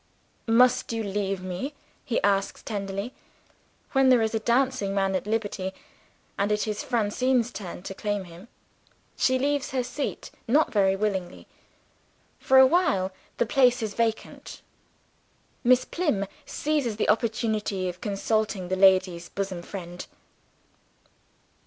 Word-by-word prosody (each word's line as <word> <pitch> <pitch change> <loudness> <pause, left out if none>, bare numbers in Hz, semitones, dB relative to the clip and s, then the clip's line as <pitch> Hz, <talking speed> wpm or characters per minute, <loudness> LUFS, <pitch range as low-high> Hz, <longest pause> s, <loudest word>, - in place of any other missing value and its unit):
"Must 245 +2 +4
you 225 -1 -2
leave 195 -2 -2
me?" 185 +11 -4 0.3
he 240 -5 0
asks 195 -1 +1
tenderly, 200 +2 -4 0.8
when 270 -1 +4
there 245 -3 +5
is 220 0 -1
a 225 - +1
dancing 235 -4 +1
man 195 -1 +1
at 190 +2 -2
liberty, 205 -4 -2 0.7
and 200 +1 +1
it 210 +1 0
is 210 -1 -2
Francine's 250 -1 +1
turn 185 -5 -7
to 195 - -6
claim 205 0 -2
him. 175 +4 -13 0.7
She 260 0 +2
leaves 285 +1 0
her 255 -2 -1
seat 280 +3 -5 0.2
not 290 +7 +3
very 195 -2 +3
willingly. 195 -3 -3 0.9
For 265 - +4
a 265 - +10
while, 260 - +2 0.3
the - - +2
place 245 -1 +3
is 215 -2 -3
vacant; 230 -1 -3 1.0
Miss 250 0 +4
Plym 295 - -1 0.2
seizes 290 -7 -1
the - - 0
opportunity 215 -3 0
of 180 0 -6
consulting 205 -2 -1
the 185 - +1
ladies' 185 -2 +3
bosom 195 -3 -4
friend. 175 -1 -8
210 Hz, 135 wpm, -26 LUFS, 195-250 Hz, 1.0 s, a